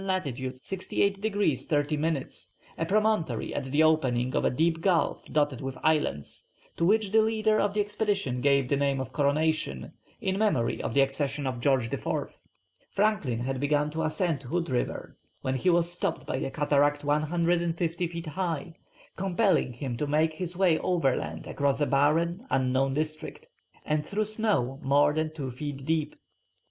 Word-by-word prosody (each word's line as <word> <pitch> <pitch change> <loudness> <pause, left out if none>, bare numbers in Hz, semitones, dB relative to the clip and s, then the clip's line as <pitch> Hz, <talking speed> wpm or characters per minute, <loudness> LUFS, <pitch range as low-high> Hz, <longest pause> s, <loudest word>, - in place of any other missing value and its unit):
lat. 190 -2 0
68 140 +10 -2
degrees 205 -1 0
30 145 -1 +1
minutes, 145 - -3 0.2
a 165 - -2
promontory 215 -2 +1
at 145 - -3
the 145 +4 +2
opening 130 -6 +2
of - - +1
a - - +3
deep 165 +4 +1
gulf 170 -5 +1
dotted 145 -4 +1
with 135 -1 -5
islands, 150 - 0 0.3
to - - -2
which 205 +2 +3
the 220 +1 +5
leader 220 -1 +2
of 205 0 0
the 210 - +3
expedition 205 - -1
gave 140 -1 +3
the 140 - +1
name 140 -1 +1
of 130 -1 -5
Coronation, 150 - 0 0.3
in 190 +1 -1
memory 135 - +1
of - - -3
the 140 - +6
accession 140 +1 -1
of 130 -2 -2
George 130 -2 +1
IV. - - -3 0.5
Franklin 195 - 0
had 130 +1 -2
begun 145 +1 +1
to 160 +1 -3
ascend 160 -1 0
Hood 165 +4 -2
River, 125 - -2 0.3
when 130 - 0
he 135 +8 +1
was 170 0 +2
stopped 175 - -3
by - - -2
a 135 - -2
cataract 145 0 +2
250 170 +3 0
feet 170 0 -6
high, 165 0 -3 0.4
compelling 190 - +1
him 120 0 -5
to 150 - -2
make 155 +2 +2
his 175 +1 -5
way 180 -4 +3
overland 130 - -1
across 140 -1 0
a 145 - +3
barren, 165 - +1
unknown 130 +1 +1
district, 155 - -4 0.4
and 150 0 0
through 215 +5 -1
snow 205 - 0
more 145 +1 +3
than 155 0 -1
two 140 -5 -5
feet 135 +1 -6
deep. 155 -1 0
155 Hz, 165 wpm, -28 LUFS, 135-175 Hz, 0.5 s, the